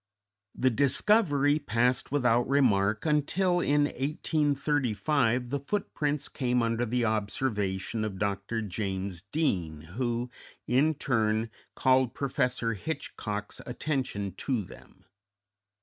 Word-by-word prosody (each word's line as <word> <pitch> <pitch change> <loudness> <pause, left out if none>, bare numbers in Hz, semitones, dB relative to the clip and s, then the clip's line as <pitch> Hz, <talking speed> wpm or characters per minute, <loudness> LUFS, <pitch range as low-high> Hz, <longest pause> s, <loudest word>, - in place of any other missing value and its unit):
The 130 0 +2
discovery 145 - +3
passed 125 -1 0
without 125 -4 +2
remark 110 -6 +3
until 175 +4 +2
in 145 -3 +3
1835 140 -4 0
the 140 - 0
footprints 150 -3 -2
came 125 -2 0
under 115 +1 0
the 120 +1 +1
observation 105 -1 -1
of 105 -3 -3
Dr. 100 +3 -2
James 95 -3 -3
Deane, 95 - -1
who, 120 +1 -2 0.3
in 145 +6 +3
turn, 110 -5 0 0.2
called 130 -2 +3
Professor 125 -4 0
Hitchcock's 105 -4 -5
attention 125 -6 -2
to 125 -6 -1
them. - - -15
125 Hz, 100 wpm, -29 LUFS, 110-145 Hz, 0.3 s, discovery